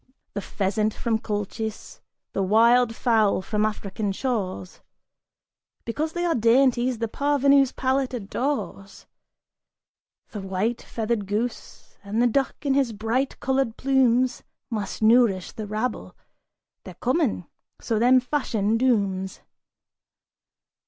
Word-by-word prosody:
The 205 Hz, -, -3 dB
pheasant 210 Hz, +2 st, -1 dB
from 225 Hz, -2 st, -1 dB
Colchis, 215 Hz, +1 st, -5 dB, 0.3 s
the 195 Hz, -, -1 dB
wild 230 Hz, +4 st, +4 dB
fowl 220 Hz, -6 st, +2 dB
from 210 Hz, +1 st, 0 dB
African 205 Hz, -1 st, -3 dB
shores, 195 Hz, -5 st, -3 dB, 1.0 s
Because 305 Hz, +7 st, -2 dB
they 345 Hz, 0 st, -1 dB
are 340 Hz, -, +2 dB
dainties, 245 Hz, +1 st, +3 dB
the 230 Hz, +1 st, -2 dB
parvenu's 280 Hz, +1 st, +3 dB
palate 265 Hz, 0 st, 0 dB
adores 230 Hz, -2 st, -4 dB, 1.3 s
The 210 Hz, -5 st, -6 dB
white 195 Hz, +5 st, -2 dB
feathered 220 Hz, -3 st, -3 dB
goose, 220 Hz, +4 st, -5 dB
and 205 Hz, +3 st, -3 dB
the 240 Hz, -, +4 dB
duck 265 Hz, +3 st, +1 dB
in 275 Hz, -, +2 dB
his 270 Hz, -4 st, +1 dB
bright 225 Hz, +6 st, -2 dB
colored 265 Hz, -3 st, 0 dB
plumes 255 Hz, -2 st, +2 dB, 0.3 s
Must 215 Hz, -1 st, -4 dB
nourish 220 Hz, -5 st, +4 dB
the 215 Hz, -1 st, -7 dB
rabble; 215 Hz, +4 st, -3 dB, 0.7 s
they're -, -, -10 dB
common, 255 Hz, -, 0 dB, 0.3 s
so 225 Hz, -2 st, -1 dB
them 250 Hz, +3 st, +5 dB
Fashion 230 Hz, -5 st, 0 dB
dooms! 200 Hz, -6 st, 0 dB
230 Hz, 115 wpm, -24 LUFS, 210-255 Hz, 1.3 s, them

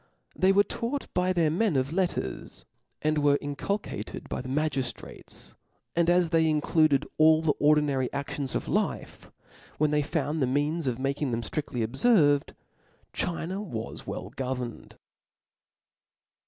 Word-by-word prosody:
They 190 Hz, +1 st, +4 dB
were 200 Hz, +1 st, +5 dB
taught 245 Hz, +6 st, -3 dB
by 180 Hz, 0 st, +1 dB
their 170 Hz, -4 st, +2 dB
men 185 Hz, 0 st, +1 dB
of 135 Hz, +3 st, 0 dB
letters, 175 Hz, -, -3 dB, 0.4 s
they 155 Hz, -, +2 dB
were 145 Hz, -2 st, +3 dB
inculcated 145 Hz, -, -4 dB
by -, -, -3 dB
the 130 Hz, -, -7 dB
magiftrates 135 Hz, -4 st, -4 dB, 0.2 s
% -, -, -47 dB
and 170 Hz, 0 st, +3 dB
as 175 Hz, -1 st, +3 dB
they 160 Hz, -1 st, +3 dB
included 155 Hz, -1 st, +2 dB
all 155 Hz, 0 st, +6 dB
the 155 Hz, -2 st, +3 dB
ordinary 145 Hz, -3 st, +2 dB
actions 140 Hz, -1 st, -4 dB
of -, -, -2 dB
life, -, -, -2 dB, 0.5 s
when 150 Hz, 0 st, +2 dB
they 150 Hz, 0 st, +2 dB
found 150 Hz, 0 st, -2 dB
the 130 Hz, -, +2 dB
means 145 Hz, +4 st, 0 dB
of 120 Hz, -2 st, 0 dB
making 140 Hz, +2 st, -1 dB
them 115 Hz, -1 st, -2 dB
ftriftly 125 Hz, -1 st, -2 dB
obferVed, 145 Hz, -, +3 dB, 0.6 s
China 180 Hz, +3 st, -3 dB
was 115 Hz, -, -6 dB
well -, -, -5 dB
governed. 125 Hz, -2 st, -5 dB
150 Hz, 140 wpm, -27 LUFS, 135-170 Hz, 0.6 s, all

